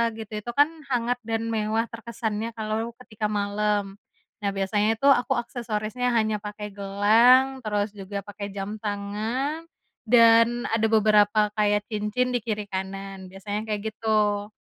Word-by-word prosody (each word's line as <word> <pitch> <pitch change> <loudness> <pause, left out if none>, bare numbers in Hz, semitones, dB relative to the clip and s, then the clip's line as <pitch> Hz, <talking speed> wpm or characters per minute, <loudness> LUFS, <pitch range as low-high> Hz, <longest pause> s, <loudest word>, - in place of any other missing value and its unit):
gitu 220 -1 -9
itu 240 +3 -6
kan 290 +1 +6 0.2
hangat 245 -1 0
dan 225 0 -1
mewah 220 0 0
terkesannya 230 -1 -4
kalau 220 +1 -3
ketika 215 -3 -3
malam. 205 -1 -1 0.4
Nah, 205 - -1
biasanya 205 +3 +1
tuh 275 +5 +4
aku 265 0 +2
aksesorisnya 235 0 -3
hanya 215 -1 +1
pakai 210 0 -7
gelang 225 +7 +4
terus 210 -1 -1
juga 200 +1 -5
pakai 205 0 -7
jam 205 +2 -5
tangan, 220 +10 -3 0.4
dan 230 +1 +5
ada 225 0 +2
beberapa 210 0 +4
kayak 210 -1 +1
cincin 215 +4 -1
di 245 - +1
kiri 215 -2 -3
kanan 190 0 -5
biasanya 205 +3 -5
kayak 215 +1 -3
gitu. 210 -2 0
215 Hz, 140 wpm, -25 LUFS, 205-230 Hz, 0.4 s, kan